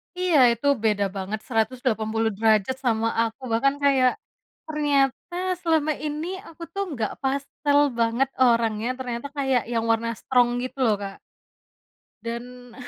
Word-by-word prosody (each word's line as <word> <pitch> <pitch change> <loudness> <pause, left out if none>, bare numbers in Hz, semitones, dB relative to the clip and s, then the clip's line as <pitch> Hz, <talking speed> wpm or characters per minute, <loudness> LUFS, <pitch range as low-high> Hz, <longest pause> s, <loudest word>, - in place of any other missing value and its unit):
Iya 360 -3 +2 0.2
itu 235 +5 -3 0.2
beda 210 -2 +2
banget 195 +3 -3
180 225 -2 0
derajat 220 +2 +2
sama 225 -1 +2 0.2
aku, 225 +4 -7
bahkan 275 +5 +2
kayak 265 -3 +4 0.6
ternyata 290 +1 0 0.3
selama 320 -2 +2
ini 300 +2 -3 0.2
aku 330 +1 -11
tuh 395 - -1
nggak 225 -5 -2
pastel 280 +2 +1 0.2
banget 235 +4 +2
orangnya, 230 -2 +3
ternyata 245 0 -4
kayak 265 -3 +1
yang 230 -1 0
warna 230 +1 0
strong 245 -2 +3
gitu 255 +2 -6
loh 215 -3 +3
Kak. 195 -1 -6 1.1
Dan 245 +1 -7
245 Hz, 130 wpm, -24 LUFS, 225-280 Hz, 1.1 s, kayak